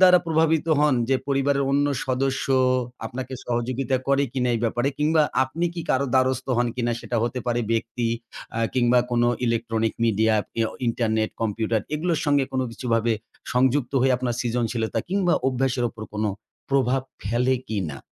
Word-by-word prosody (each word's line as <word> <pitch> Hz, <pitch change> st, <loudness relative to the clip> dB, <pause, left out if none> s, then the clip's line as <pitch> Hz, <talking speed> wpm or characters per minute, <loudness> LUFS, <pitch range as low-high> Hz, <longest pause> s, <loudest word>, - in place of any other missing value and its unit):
দ্বারা 180 Hz, -1 st, +8 dB
প্রভাবিত 160 Hz, 0 st, +2 dB
হন? 150 Hz, -2 st, +4 dB
যে 135 Hz, -, +4 dB
পরিবারের 140 Hz, 0 st, +2 dB
অন্য 145 Hz, +1 st, +3 dB, 0.2 s
সদস্য 130 Hz, +1 st, 0 dB, 0.6 s
আপনাকে 130 Hz, +2 st, -6 dB
সহযোগিতা 125 Hz, +2 st, -1 dB
করে 140 Hz, 0 st, +3 dB
কিনা? 125 Hz, -2 st, 0 dB
এই 115 Hz, -, -1 dB
ব্যাপারে 120 Hz, +4 st, +1 dB
কিংবা 155 Hz, +1 st, +3 dB, 0.2 s
আপনি 165 Hz, +7 st, -3 dB
কি 170 Hz, -, -4 dB
কারো 140 Hz, +1 st, +2 dB
দ্বারস্থ 130 Hz, 0 st, +2 dB
হন 120 Hz, -, +2 dB
কিনা? 120 Hz, -1 st, 0 dB
সেটা 120 Hz, -, -3 dB
হতে 120 Hz, +2 st, -1 dB
পারে 120 Hz, 0 st, +1 dB
ব্যক্তি 115 Hz, +1 st, -1 dB, 0.5 s
আ -, -, -1 dB, 0.2 s
কিংবা 125 Hz, 0 st, +4 dB
কোন 120 Hz, 0 st, +2 dB, 0.2 s
electronic 115 Hz, -1 st, 0 dB
media 110 Hz, 0 st, +3 dB, 0.2 s
পি -, -, -9 dB
আউ -, -, -6 dB, 0.2 s
ইন্টারনেট, 110 Hz, -2 st, 0 dB
কম্পিউটার 110 Hz, 0 st, 0 dB
এগুলোর 165 Hz, 0 st, 0 dB
সঙ্গে 145 Hz, -2 st, +3 dB
কোন 130 Hz, -, 0 dB
কিছুভাবে 115 Hz, -1 st, 0 dB, 0.4 s
সংযুক্ত 130 Hz, +1 st, +2 dB
হয়ে 130 Hz, 0 st, +3 dB
আপনার 125 Hz, -2 st, -2 dB
সৃজনশীলতা 115 Hz, -2 st, -1 dB
কিংবা 190 Hz, -2 st, +2 dB
অভ্যাসের 130 Hz, -1 st, 0 dB
উপর 110 Hz, -1 st, -10 dB
কোন 105 Hz, +1 st, -2 dB, 0.5 s
প্রভাব 135 Hz, -1 st, +2 dB, 0.2 s
ফেলে 120 Hz, +5 st, +1 dB
কিনা? 90 Hz, -10 st, -3 dB
125 Hz, 160 wpm, -24 LUFS, 115-135 Hz, 0.6 s, দ্বারা